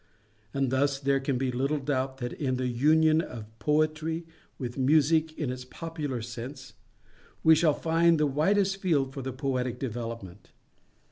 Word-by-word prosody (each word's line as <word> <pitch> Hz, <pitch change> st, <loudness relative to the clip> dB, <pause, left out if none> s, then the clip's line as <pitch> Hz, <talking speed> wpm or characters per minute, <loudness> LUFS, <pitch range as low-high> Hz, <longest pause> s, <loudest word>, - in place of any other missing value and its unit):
And 135 Hz, 0 st, 0 dB
thus 140 Hz, +1 st, +2 dB
there 135 Hz, 0 st, +1 dB
can 135 Hz, -1 st, -1 dB
be 130 Hz, 0 st, 0 dB
little 135 Hz, +5 st, 0 dB
doubt 135 Hz, -1 st, -2 dB
that 120 Hz, -2 st, -4 dB
in 130 Hz, -3 st, -1 dB
the 130 Hz, 0 st, -2 dB
union 155 Hz, +6 st, +4 dB
of 120 Hz, -9 st, -7 dB
Poetry 155 Hz, +3 st, 0 dB, 0.3 s
with 120 Hz, -3 st, -5 dB
Music 155 Hz, +3 st, +3 dB
in 145 Hz, -5 st, -2 dB
its 125 Hz, 0 st, -6 dB
popular 145 Hz, -3 st, -5 dB
sense, 125 Hz, 0 st, -8 dB, 0.7 s
we 160 Hz, -, +8 dB
shall 155 Hz, -2 st, +3 dB
find 165 Hz, 0 st, +3 dB
the 150 Hz, -, +3 dB
widest 190 Hz, +8 st, +2 dB
field 150 Hz, -9 st, +1 dB
for 135 Hz, -, -5 dB
the 130 Hz, +1 st, -4 dB
Poetic 130 Hz, -2 st, -2 dB
development. 115 Hz, -6 st, -6 dB
135 Hz, 155 wpm, -28 LUFS, 125-155 Hz, 0.7 s, we